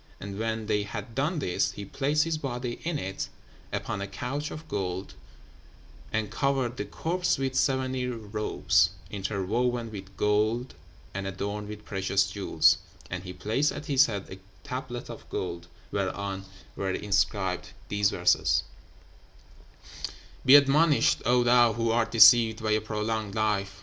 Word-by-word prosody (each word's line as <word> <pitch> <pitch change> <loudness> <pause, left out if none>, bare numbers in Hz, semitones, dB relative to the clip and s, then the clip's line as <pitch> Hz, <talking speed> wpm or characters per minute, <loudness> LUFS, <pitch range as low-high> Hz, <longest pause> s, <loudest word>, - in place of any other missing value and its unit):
And 100 +1 -6
when 110 0 -2
they 105 -1 +1
had 105 +3 -6
done 145 +8 0
this, 90 -12 0
he 100 - -7
placed 145 +7 +1
his 160 -1 -2
body 125 -3 -4
in 170 -2 -1
it, 95 -6 -4 0.4
upon 100 - -3
a 100 - -3
couch 135 +9 -4
of 155 - -8
gold, 95 -1 -3 1.0
and 110 -2 -1
covered 130 0 0
the - - -3
corpse 180 +2 -1
with 135 -1 -1
seventy 130 -1 +1
robes, 110 -3 +1 0.2
interwoven 110 +4 -1
with 100 -2 -9
gold 110 +4 +1 0.4
and 100 0 -3
adorned 100 +2 -4
with 105 0 -8
precious 95 0 +1
jewels; 80 -6 +3 0.3
and 90 +1 -4
he 90 - -6
placed 115 +10 0
at 150 - -7
his 140 -1 +5
head 100 -4 -4
a 95 - -8 0.3
tablet 125 -1 -5
of - - -10
gold, 85 -2 -4 0.2
whereon 95 0 -2 0.3
were 95 - -2
inscribed 95 -1 0 0.2
these 105 -1 +2
verses: 90 0 +2 1.8
"'Be 130 +2 +8
admonished, 145 +1 +5
O 125 0 +4
thou 120 -1 +5
who 115 +1 0
art 115 0 +2
deceived 115 0 +7
by 110 - +1
a 110 0 +3
prolonged 110 -1 -2
life! 100 -2 0
110 Hz, 145 wpm, -28 LUFS, 100-125 Hz, 1.8 s, Be